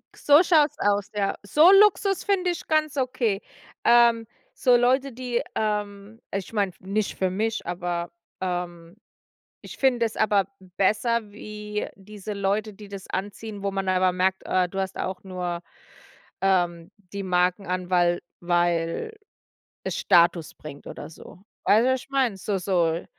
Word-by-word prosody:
K - - -17
so 295 +2 +7
schaut 310 -5 +4
es - - -29
aus, 205 -1 +1
ja. 200 -1 0
So 300 - +6
Luxus 395 -1 +4
finde 370 -3 +1
ich 345 - -6
ganz 310 -1 +1
okay. 240 -6 0 0.4
Ähm, 235 -1 +5 0.3
so 250 -1 +3
Leute, 260 +3 +2
die 245 0 -2
ähm, 210 0 -3
ich 195 +2 -4
meine, 200 -3 +1
nicht 200 +2 -2
für 190 - +1
mich, 215 +4 -2
aber 175 -1 -3 0.3
ähm, 175 -1 -4 0.7
ich - - -10
finde 250 -3 +2
es 225 - -4
aber 200 -3 +3 0.3
besser 215 +2 +1
wie 210 0 -5
diese 205 +1 -9
Leute, 205 +2 -1
die 205 0 -12
das 195 -1 -9
anziehen, 205 +1 -5
wo 200 - -1
man 195 -1 -2
aber 185 0 +2
merkt, 190 +1 0
äh, 185 -1 +1
du 195 - -4
hast 190 0 -3
auch 185 -1 -4
nur, 180 -2 -4 0.8
ähm, 175 -2 +1 0.2
die 200 0 -4
Marken 180 +1 +1
an, 180 0 -3
weil 175 -1 +2 0.2
weil 175 - 0 0.7
es - - -3
Status 170 -3 +3
bringt 145 -2 -11
oder - - -8
so. 165 - -14 0.3
Weißt 220 +3 +5
du, 260 - +4
was 260 - -2
ich - - -17
meine? 265 -6 +1
So 200 +1 -2
so, 175 -3 0
200 Hz, 160 wpm, -25 LUFS, 180-230 Hz, 0.8 s, so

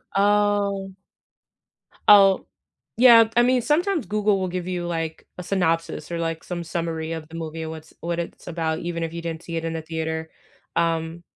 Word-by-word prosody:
Oh. 200 -1 +2 1.1
Oh. 195 -2 +7 0.5
Yeah, 230 -2 +8
I 240 - +6
mean, 250 0 +3
sometimes 335 +1 +1
Google 210 -1 +1
will 185 - -1
give 180 0 -4
you, 175 -1 -3
like, 165 -2 -4
a - - -5
synopsis 165 -3 -1
or, 170 - -2
like, 165 -1 -3
some 175 -1 -5
summary 165 -1 -3
of 155 -1 -6
the - - -17
movie 160 0 -5
and 160 - -5
what's 160 -1 -10
what 170 0 -2
it's 170 - -6
about, 160 -2 -2
even 170 -1 -4
if 165 - -3
you 170 - -4
didn't 165 -1 -5
see 170 -1 -6
it 165 - -3
in 165 - -2
the 160 - -3
theater. 160 0 -4 0.5
Um 165 0 0
170 Hz, 185 wpm, -24 LUFS, 165-200 Hz, 1.1 s, Yeah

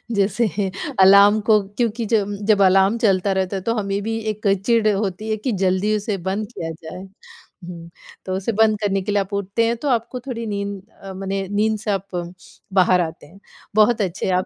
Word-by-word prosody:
जैसे 205 +3 +1 0.5
अलार्म 200 +2 +7
को 215 -2 +5
क्योंकि 225 +2 -2
जम 205 -2 0
जब 210 -2 +3
अलार्म 195 +3 +4
चलता 200 -4 +2
रहता 190 0 -1
है, 190 - -3
तो 230 +4 -1
हमें 200 -2 -2
भी 225 +1 -2
एक 215 0 -4 0.2
चिढ़ 230 -2 +3
होती 200 +1 -3
है 220 - 0
कि 250 +4 -3
जल्दी 190 +1 +1
उसे 210 -1 -2
बंद 205 +2 -2
किया 165 -8 -5
जाए। 160 +4 -8 0.6
हुँ, 170 -1 -9 0.4
तो 185 - -3
उसे 195 +4 -2
बंद 215 -1 +2
करने 195 -2 0
के 200 +2 -3
लिए 200 -1 +2
आप 195 +1 -7
उठते 200 +3 0
हैं 230 +1 +1
तो 290 - -5
आपको 240 0 -1
थोड़ी 235 -2 -6
नींद 200 -1 -4 0.2
अ, 195 -1 -7
मने 195 0 -4
नींद 215 +1 +1
से 210 - -2
आप 195 0 -2 0.7
बाहर 185 -1 +4
आते 160 -2 -5
हैं। 185 +6 -18 0.4
बहुत 215 +1 +4
अच्छे 190 0 -2
आप 185 0 +1
200 Hz, 200 wpm, -21 LUFS, 190-220 Hz, 0.7 s, अलार्म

